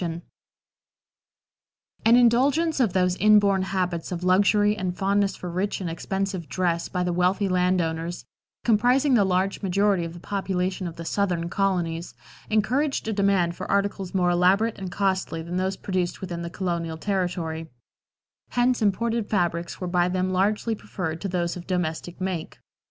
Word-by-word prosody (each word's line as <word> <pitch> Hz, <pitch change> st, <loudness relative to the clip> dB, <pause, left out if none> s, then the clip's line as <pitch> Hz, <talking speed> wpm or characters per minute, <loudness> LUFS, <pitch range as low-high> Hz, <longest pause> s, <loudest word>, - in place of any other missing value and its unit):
No. -, -, 0 dB
3. 165 Hz, +1 st, -5 dB, 1.8 s
An 230 Hz, +1 st, +7 dB
indulgence 270 Hz, +7 st, +3 dB
of 225 Hz, -8 st, +2 dB
those 180 Hz, -1 st, +2 dB
inborn 205 Hz, -2 st, +5 dB
habits 185 Hz, -3 st, -2 dB
of 180 Hz, -1 st, -4 dB
luxury 205 Hz, +3 st, +4 dB
and 185 Hz, -3 st, -3 dB
fondness 200 Hz, 0 st, +1 dB
for 180 Hz, -, -7 dB
rich 185 Hz, +4 st, -2 dB
and 185 Hz, -, -4 dB
expensive 190 Hz, -1 st, -3 dB
dress 170 Hz, -1 st, -1 dB
by 180 Hz, -, -1 dB
the 180 Hz, -1 st, -1 dB
wealthy 180 Hz, +3 st, +2 dB
land 180 Hz, 0 st, +2 dB
owners, 165 Hz, -2 st, -3 dB, 0.4 s
comprising 245 Hz, +5 st, +3 dB
the 220 Hz, -5 st, +5 dB
large 190 Hz, +1 st, 0 dB
majority 195 Hz, -1 st, +2 dB
of 165 Hz, 0 st, -5 dB
the -, -, -9 dB
population 185 Hz, -1 st, -2 dB
of 165 Hz, -, -7 dB
the 165 Hz, -, -8 dB
Southern 175 Hz, -3 st, -1 dB
colonies, 175 Hz, -3 st, -1 dB, 0.3 s
encouraged 250 Hz, +6 st, +1 dB
a -, -, 0 dB
demand 195 Hz, -4 st, +2 dB
for 185 Hz, -, -7 dB
articles 200 Hz, -2 st, -1 dB
more 180 Hz, -1 st, +3 dB
elaborate 195 Hz, +6 st, +2 dB
and 190 Hz, -2 st, -5 dB
costly 190 Hz, -4 st, -1 dB
than 175 Hz, +2 st, -4 dB
those 190 Hz, +1 st, -1 dB
produced 185 Hz, -2 st, -2 dB
within 175 Hz, -3 st, -5 dB
the 170 Hz, -, -4 dB
colonial 170 Hz, -3 st, -3 dB
territory; 175 Hz, -4 st, -2 dB, 0.8 s
hence 245 Hz, 0 st, +1 dB
imported 225 Hz, +2 st, 0 dB
fabrics 175 Hz, -3 st, -1 dB
were 185 Hz, -, -4 dB
by 175 Hz, 0 st, +1 dB
them 185 Hz, 0 st, 0 dB
largely 210 Hz, +4 st, +1 dB
preferred 165 Hz, -6 st, -5 dB
to 200 Hz, -, -2 dB
those 175 Hz, -2 st, -1 dB
of 180 Hz, -1 st, -9 dB
domestic 175 Hz, -1 st, -3 dB
make. 185 Hz, -3 st, -4 dB
185 Hz, 160 wpm, -25 LUFS, 175-200 Hz, 1.8 s, An